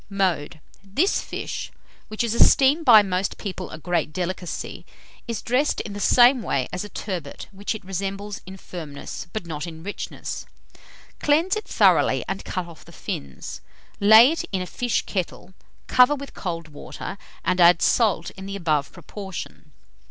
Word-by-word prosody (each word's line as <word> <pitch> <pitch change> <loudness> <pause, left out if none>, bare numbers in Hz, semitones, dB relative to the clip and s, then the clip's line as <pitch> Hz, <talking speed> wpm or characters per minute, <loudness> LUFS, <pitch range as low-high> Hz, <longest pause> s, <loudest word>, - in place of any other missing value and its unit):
Mode. 175 -6 -1 0.2
This 280 - +1
fish, - - -5 0.4
which 215 +2 -2
is 230 -2 0
esteemed 280 +6 +5
by 220 -4 +9
most 190 0 -1
people 190 -3 -5
a - - -8
great 165 -1 -1
delicacy, 180 0 -4 0.4
is 230 -2 -4
dressed 255 +5 +1
in 205 - -7
the 205 - -6
same 245 +4 +6
way 135 - -1
as 180 - -2
a 210 - -8
turbot, 175 -10 -5
which 200 +2 -3
it 215 - -9
resembles 195 +2 -4
in 190 +1 -8
firmness, 160 -3 -8
but 215 -2 -4
not 160 0 -5
in 160 -1 -9
richness. 205 +2 -6 0.7
Cleanse 325 +7 +3
it 430 - -5
thoroughly - - +3
and 195 0 -3
cut 185 -1 -3
off 170 -2 -13
the - - -15
fins; 70 -1 -6 0.4
lay 220 +6 +8
it 330 - -2
in 190 -2 -1
a - - -6
fish 245 +5 -1
kettle, 185 -1 -4 0.3
cover 250 +3 +5
with 280 0 -9
cold 165 -3 -5
water, 150 +5 -7 0.3
and 180 +1 +2
add 175 0 +6
salt 205 -8 +2
in 190 0 -9
the 200 - -5
above 155 -6 0
proportion. 190 -6 -8
195 Hz, 165 wpm, -24 LUFS, 170-220 Hz, 0.7 s, by